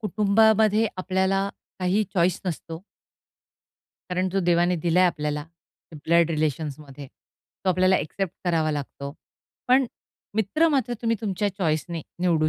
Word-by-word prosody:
कुटुंबामध्ये 215 Hz, 0 st, +3 dB
आपल्याला, 190 Hz, +1 st, 0 dB, 0.3 s
काही 190 Hz, +4 st, +1 dB
चॉइस 175 Hz, +1 st, +2 dB
नसतो. 165 Hz, -1 st, -5 dB, 1.3 s
कारण 185 Hz, +1 st, 0 dB
जो 195 Hz, +1 st, 0 dB
देवाने 175 Hz, 0 st, +2 dB
दिलाय 170 Hz, +2 st, +3 dB
आपल्याला, 150 Hz, -3 st, -2 dB, 0.5 s
ब्लड 165 Hz, +2 st, +2 dB
रिलेशन्समध्ये, 150 Hz, -2 st, -3 dB, 0.6 s
तो -, -, +1 dB
आपल्याला 185 Hz, +1 st, +3 dB
ॲक्सेप्ट 190 Hz, +3 st, -3 dB
करावा 165 Hz, -3 st, +1 dB
लागतो. 140 Hz, -1 st, -5 dB, 0.6 s
पण, 260 Hz, +1 st, +5 dB, 0.5 s
मित्र 220 Hz, -, +2 dB
मात्र 265 Hz, -5 st, 0 dB
तुम्ही 230 Hz, -1 st, +1 dB
तुमच्या 205 Hz, -1 st, -1 dB
चॉईस 160 Hz, -4 st, +1 dB
ने 165 Hz, -3 st, -4 dB, 0.2 s
निवडू 165 Hz, -4 st, +2 dB
180 Hz, 120 wpm, -25 LUFS, 160-200 Hz, 1.3 s, पण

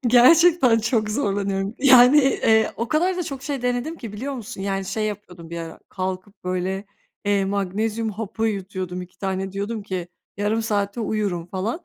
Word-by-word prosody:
Gerçekten 255 Hz, +1 st, +6 dB
çok 225 Hz, -1 st, 0 dB
zorlanıyorum. 200 Hz, -3 st, -1 dB
Yani, 260 Hz, +1 st, +7 dB
eee, 225 Hz, -5 st, +3 dB
o 230 Hz, +1 st, -3 dB
kadar 355 Hz, +4 st, +1 dB
da 360 Hz, -, -1 dB
çok 275 Hz, -5 st, -6 dB
şey 275 Hz, -3 st, -3 dB
denedim 250 Hz, +6 st, -1 dB
ki, 230 Hz, -9 st, -8 dB
biliyor 265 Hz, +7 st, -4 dB
musun? 225 Hz, -5 st, -7 dB
Yani, 195 Hz, 0 st, -2 dB
şey 205 Hz, +3 st, -2 dB
yapıyordum 180 Hz, -5 st, -7 dB
bir 170 Hz, -, -4 dB
ara, 165 Hz, -1 st, -7 dB
kalkıp 185 Hz, +2 st, -5 dB
böyle, 185 Hz, +2 st, -2 dB, 0.4 s
eee, 200 Hz, -1 st, +2 dB
magnezyum 205 Hz, +3 st, -1 dB
hapı 220 Hz, +1 st, -3 dB
yutuyordum, 185 Hz, -3 st, -4 dB
2 180 Hz, 0 st, -14 dB
tane 190 Hz, -1 st, -3 dB
diyordum 205 Hz, +3 st, -3 dB
ki 185 Hz, -3 st, -4 dB, 0.3 s
yarım 210 Hz, +3 st, 0 dB
saate 205 Hz, 0 st, -1 dB
uyurum 205 Hz, -6 st, -1 dB
falan. 200 Hz, -, -3 dB
210 Hz, 165 wpm, -23 LUFS, 195-240 Hz, 0.4 s, Yani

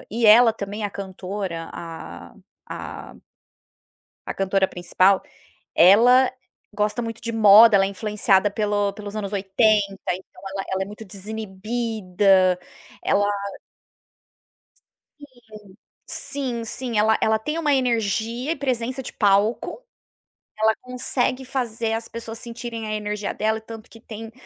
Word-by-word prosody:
e 230 Hz, +1 st, +1 dB
ela, 225 Hz, +2 st, +8 dB
também, 210 Hz, 0 st, -5 dB
a 205 Hz, -, -2 dB
cantora 190 Hz, -3 st, -6 dB
a 165 Hz, -1 st, -9 dB, 0.4 s
a -, -, -8 dB, 1.1 s
a -, -, -3 dB
cantora 195 Hz, 0 st, +1 dB
principal, 185 Hz, +2 st, +2 dB, 0.5 s
ela 240 Hz, +9 st, +6 dB, 0.4 s
gosta 210 Hz, +3 st, -1 dB
muito 230 Hz, 0 st, -6 dB
de 230 Hz, 0 st, -4 dB
moda, 215 Hz, 0 st, +8 dB
ela 195 Hz, -1 st, +4 dB
é -, -, -1 dB
influenciada 205 Hz, -1 st, +1 dB
pelo 205 Hz, -1 st, 0 dB
pelos 205 Hz, 0 st, -8 dB
anos 205 Hz, -1 st, -4 dB
80, 205 Hz, +2 st, +3 dB, 0.3 s
então, 185 Hz, +2 st, -5 dB
ela 195 Hz, -, -2 dB
ela 190 Hz, 0 st, -1 dB
é -, -, -8 dB
muito 210 Hz, +2 st, -10 dB
desinibida, 195 Hz, -2 st, 0 dB, 0.4 s
ela 205 Hz, 0 st, +2 dB, 1.9 s
Sim, 290 Hz, -, -11 dB, 0.8 s
sim, 255 Hz, -5 st, -2 dB
sim, 240 Hz, -1 st, -3 dB
ela 220 Hz, +1 st, +4 dB
ela 220 Hz, 0 st, +3 dB
tem 300 Hz, +8 st, -3 dB
uma 300 Hz, -3 st, +1 dB
energia 235 Hz, +1 st, 0 dB
e 335 Hz, -, 0 dB
presença 255 Hz, -1 st, -2 dB
de -, -, -8 dB
palco, 210 Hz, -, +1 dB, 0.7 s
ela 220 Hz, 0 st, +3 dB
consegue 250 Hz, +1 st, -2 dB
fazer 235 Hz, -4 st, -2 dB
as 225 Hz, 0 st, -3 dB
pessoas 230 Hz, -1 st, -8 dB
sentirem 235 Hz, -2 st, -6 dB
a 215 Hz, -, -3 dB
energia 210 Hz, -1 st, -3 dB
dela. 220 Hz, +1 st, 0 dB
É -, -, -10 dB
tanto 225 Hz, 0 st, -11 dB
que 225 Hz, -, -15 dB
tem, 225 Hz, 0 st, -9 dB
215 Hz, 130 wpm, -23 LUFS, 200-230 Hz, 1.9 s, ela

